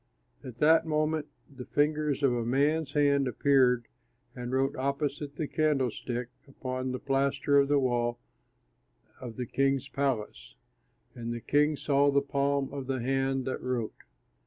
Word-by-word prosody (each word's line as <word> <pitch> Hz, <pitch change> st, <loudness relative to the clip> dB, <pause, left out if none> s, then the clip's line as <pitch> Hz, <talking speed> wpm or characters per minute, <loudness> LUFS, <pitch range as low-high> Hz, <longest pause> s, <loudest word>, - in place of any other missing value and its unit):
At 125 Hz, -3 st, -9 dB
that 160 Hz, +3 st, +4 dB
moment 155 Hz, 0 st, 0 dB, 0.2 s
the 135 Hz, -3 st, -10 dB
fingers 150 Hz, -1 st, 0 dB
of 135 Hz, -3 st, +4 dB
a 120 Hz, -1 st, -1 dB
man's 145 Hz, +5 st, +1 dB
hand 140 Hz, -2 st, +3 dB
appeared 125 Hz, -1 st, +3 dB, 0.5 s
and 125 Hz, -1 st, -5 dB
wrote 135 Hz, +1 st, +1 dB
opposite 140 Hz, +1 st, -2 dB
the 150 Hz, -1 st, -3 dB
candlestick 130 Hz, -5 st, -1 dB, 0.2 s
upon 130 Hz, -1 st, -4 dB
the 130 Hz, -, -2 dB
plaster 140 Hz, +1 st, +1 dB
of 140 Hz, -, +3 dB
the 145 Hz, 0 st, +3 dB
wall 120 Hz, -3 st, 0 dB, 1.0 s
of 120 Hz, -3 st, -7 dB
the 125 Hz, -, -3 dB
king's 135 Hz, +2 st, 0 dB
palace; 110 Hz, -, -3 dB, 0.6 s
and 120 Hz, -1 st, -5 dB
the 120 Hz, -, -3 dB
king 150 Hz, +5 st, +2 dB
saw 140 Hz, 0 st, +2 dB
the 140 Hz, 0 st, +4 dB
palm 140 Hz, 0 st, -1 dB
of 135 Hz, -2 st, -5 dB
the 135 Hz, -1 st, -1 dB
hand 135 Hz, +1 st, 0 dB
that 130 Hz, -, -3 dB
wrote. 125 Hz, -3 st, -2 dB
135 Hz, 150 wpm, -29 LUFS, 125-145 Hz, 1.0 s, that